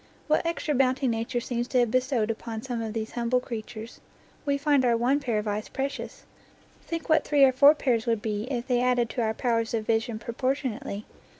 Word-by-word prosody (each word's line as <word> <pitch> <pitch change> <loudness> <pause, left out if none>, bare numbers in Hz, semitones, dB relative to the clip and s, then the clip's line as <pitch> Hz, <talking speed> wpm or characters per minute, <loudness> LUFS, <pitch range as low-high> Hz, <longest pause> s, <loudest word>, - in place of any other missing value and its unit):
What 305 - +2
extra 335 -2 -1
bounty 265 0 +2
Nature 230 +1 -1
seems 240 0 -2
to 255 - 0
have 240 -2 +2
bestowed 255 -3 +1
upon 225 0 -6
some 245 -3 -3
of 220 -1 -4
these 220 0 -3
humble 240 +1 +1
creatures! 225 -1 -7 0.5
We 280 0 +2
find 285 -1 +3
our 240 -2 +3
one 255 +5 +2
pair 245 -6 -1
of 210 0 -2
eyes 210 +1 -2
precious; 275 +1 -5 0.6
think 330 -1 -5
what 315 -2 +4
three 290 -2 +3
or 265 - +7
four 280 +4 +7
pairs 240 -6 0
would 230 -2 +2
be 210 0 -3
if 245 -3 -2
they 245 -2 +1
added 245 -2 +2
to 245 - -2
our 220 -1 0
powers 230 -2 0
of 220 -1 -2
vision 225 0 0
pro 230 +1 -6
portionately! 255 -4 -2
240 Hz, 210 wpm, -27 LUFS, 225-270 Hz, 0.6 s, or